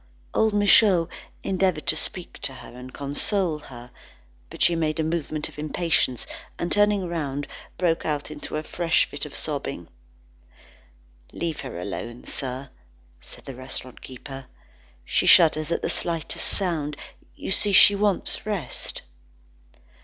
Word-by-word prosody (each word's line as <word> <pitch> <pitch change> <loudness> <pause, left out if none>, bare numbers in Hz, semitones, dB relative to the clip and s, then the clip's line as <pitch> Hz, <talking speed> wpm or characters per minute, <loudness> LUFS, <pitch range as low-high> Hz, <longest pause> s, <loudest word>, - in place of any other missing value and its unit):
Old 220 0 +3
Michaud 200 -4 +6 0.3
endeavoured 185 -4 +1
to - - +3
speak 175 +2 -5
to 140 -1 -2
her 125 - -11
and 125 +1 -9
console 155 +5 -1
her. 125 -4 -11 0.6
But - - -2
she 170 - +5
made 155 -1 0
a - - +2
movement 155 -2 -1
of - - -12
impatience, 155 -5 +1 0.3
and 170 - -2
turning 205 -2 +3
round, 145 -4 -2 0.3
broke 170 -2 +1
out 150 -1 -2
into 150 -1 -6
a 155 - -1
fresh 170 +1 +2
fit - - -5
of - - -11
sobbing. - - -3 1.4
"Leave 165 -3 -3
her 130 -10 -6
alone, 115 +6 -5
sir," 130 0 -2 0.5
said - - -12
the 135 - -6
restaurant 130 0 -7
keeper, 135 +1 -9 0.6
"she - - +1
shudders 155 -2 +6
at 170 - -1
the - - +1
slightest 165 -3 -1
sound. 155 -7 -1 0.4
You - - -5
see, 205 +1 +2
she 200 +1 +8
wants 200 -1 +1
rest." 200 - -3
155 Hz, 140 wpm, -25 LUFS, 135-180 Hz, 1.4 s, she